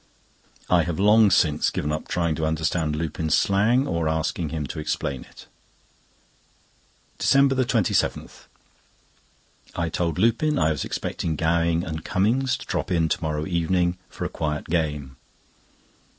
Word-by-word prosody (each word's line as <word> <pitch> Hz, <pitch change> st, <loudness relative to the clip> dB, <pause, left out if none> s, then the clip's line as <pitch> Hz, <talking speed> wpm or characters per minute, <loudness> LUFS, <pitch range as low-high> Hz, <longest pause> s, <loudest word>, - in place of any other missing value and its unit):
I 90 Hz, -1 st, +4 dB
have 85 Hz, +1 st, -3 dB
long 105 Hz, +1 st, +6 dB
since 80 Hz, -5 st, +2 dB
given 75 Hz, -, -3 dB
up 75 Hz, -, -4 dB
trying 85 Hz, -2 st, 0 dB
to 80 Hz, -, -4 dB
understand 80 Hz, 0 st, -1 dB
Lupin's 80 Hz, 0 st, -1 dB
slang, 110 Hz, +7 st, +2 dB
or 85 Hz, -, -1 dB
asking 80 Hz, +1 st, -1 dB
him 80 Hz, -2 st, -3 dB
to 70 Hz, -, -6 dB
explain 70 Hz, -4 st, -3 dB
it. -, -, -15 dB, 1.7 s
DECEMBER 135 Hz, 0 st, +4 dB
27.—I 95 Hz, -5 st, -4 dB
told 85 Hz, +1 st, -2 dB
Lupin 115 Hz, +9 st, +2 dB
I 80 Hz, -, +2 dB
was 75 Hz, -, -2 dB
expecting 80 Hz, -2 st, -3 dB
Gowing 85 Hz, +1 st, +1 dB
and 80 Hz, -3 st, -5 dB
Cummings 120 Hz, +7 st, +1 dB
to -, -, -10 dB
drop -, -, -3 dB
in 85 Hz, -3 st, +1 dB
to -, -, -1 dB
morrow 75 Hz, -1 st, -2 dB
evening 85 Hz, 0 st, 0 dB
for -, -, -6 dB
a -, -, -2 dB
quiet 75 Hz, -1 st, -3 dB
game. 75 Hz, -5 st, -2 dB
85 Hz, 135 wpm, -24 LUFS, 80-95 Hz, 1.7 s, long